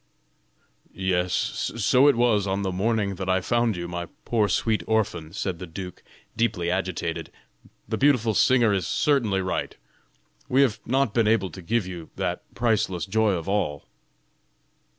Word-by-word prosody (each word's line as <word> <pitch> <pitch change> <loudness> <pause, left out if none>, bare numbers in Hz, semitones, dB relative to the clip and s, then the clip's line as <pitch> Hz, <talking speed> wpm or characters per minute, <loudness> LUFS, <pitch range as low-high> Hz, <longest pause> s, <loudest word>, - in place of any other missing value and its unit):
"Yes, 90 -1 0 0.5
so 125 +5 +4
it 145 - +5
was 115 -4 +2
on 95 +1 -1
the 95 - -1
morning 100 +1 0
that 95 0 -4
I 95 0 +3
found 120 +3 +1
you, 85 0 -4
my 85 0 -5 0.2
poor 110 -3 +1
sweet 110 +4 +1
orphan," 90 -8 0
said 95 -2 -3
the 90 - -7
duke, 90 +2 -8 0.3
deeply 100 -7 0
agitated; 90 -3 -3 0.6
"the 110 +1 -2
beautiful 125 -6 +3
singer 120 -2 +4
is 95 -6 -1
certainly 115 -10 +1
right; 95 - -3 0.7
we 135 +2 +5
have 120 -6 0
not 130 -3 +1
been 115 -3 +2
able 100 -5 +2
to 95 - -9
give 110 +4 0
you 90 -3 -8
that - - -2
`priceless 110 -6 0
joy 110 +1 +2
of 85 -3 -4
all.'" 95 -8 -1
100 Hz, 155 wpm, -25 LUFS, 90-115 Hz, 0.7 s, it